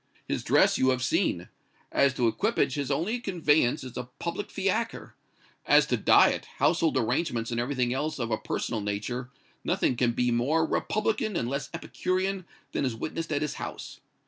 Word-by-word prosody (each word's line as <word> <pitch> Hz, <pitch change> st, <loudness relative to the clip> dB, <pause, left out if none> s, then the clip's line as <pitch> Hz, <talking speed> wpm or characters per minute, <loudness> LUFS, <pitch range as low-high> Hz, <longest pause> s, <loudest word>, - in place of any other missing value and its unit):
His -, -, -2 dB
dress -, -, +4 dB
you 130 Hz, -, +4 dB
have 130 Hz, -1 st, +1 dB
seen; -, -, 0 dB, 0.4 s
as 140 Hz, -1 st, +3 dB
to 120 Hz, -, +2 dB
equipage 200 Hz, -, +1 dB
his 140 Hz, -2 st, -2 dB
only 175 Hz, -, 0 dB
conveyance 155 Hz, -, +2 dB
is 130 Hz, -2 st, -9 dB
a 125 Hz, -1 st, -5 dB
public 170 Hz, +4 st, -4 dB
fiacre; 215 Hz, +4 st, -2 dB, 0.5 s
as -, -, +6 dB
to -, -, +1 dB
diet, -, -, +4 dB
household 165 Hz, -4 st, +2 dB
arrangements 120 Hz, -1 st, 0 dB
and 115 Hz, -, -1 dB
everything 125 Hz, -1 st, 0 dB
else 150 Hz, +3 st, -2 dB
of 120 Hz, -3 st, -3 dB
a 110 Hz, -, +2 dB
personal 110 Hz, -, -3 dB
nature, 105 Hz, +5 st, -3 dB, 0.3 s
nothing 125 Hz, -, +1 dB
can 120 Hz, -1 st, +1 dB
be 125 Hz, +1 st, +1 dB
more 145 Hz, +8 st, +2 dB
republican 215 Hz, +3 st, -1 dB
and 120 Hz, -, 0 dB
less 140 Hz, +2 st, -3 dB
epicurean 185 Hz, +2 st, -2 dB, 0.3 s
than -, -, -1 dB
is 125 Hz, -4 st, -1 dB
witnessed 160 Hz, +7 st, -4 dB
at 145 Hz, 0 st, 0 dB
his 150 Hz, -, -2 dB
house. -, -, -7 dB
140 Hz, 170 wpm, -28 LUFS, 120-170 Hz, 0.5 s, as